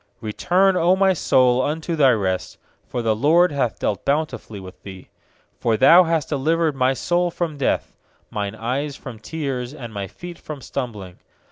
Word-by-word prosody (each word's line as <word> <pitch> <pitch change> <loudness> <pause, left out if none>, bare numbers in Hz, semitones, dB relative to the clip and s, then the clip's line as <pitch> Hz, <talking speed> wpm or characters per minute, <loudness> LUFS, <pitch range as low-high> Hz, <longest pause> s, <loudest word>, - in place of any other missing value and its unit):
7Return, 185 - +1
O 180 +1 +3
my 190 0 +3
soul, 130 -6 +3
unto 160 +4 -2
thy 140 -4 +5
rest; 95 -6 -1 0.3
For 120 - -3
the 110 -1 +2
LORD 160 +9 +4
hath 130 -6 -1
dealt 100 - -2
bountifully 140 -7 -2
with 95 -1 -12
thee. 95 -2 -11 0.5
8For 115 -2 +1
Thou 170 +9 +7
hast 165 -3 -1
delivered 155 +2 +1
my 130 0 +2
soul 175 +5 0
from 170 -2 -3
death, 140 - -1 0.4
Mine 105 0 -3
eyes 135 +6 -3
from 120 -6 -10
tears, 135 -1 -4
And 120 -6 -8
my 100 -1 -4
feet 175 - -10
from 155 -2 -8
stumbling. 110 -9 -6
135 Hz, 165 wpm, -22 LUFS, 115-165 Hz, 0.5 s, Thou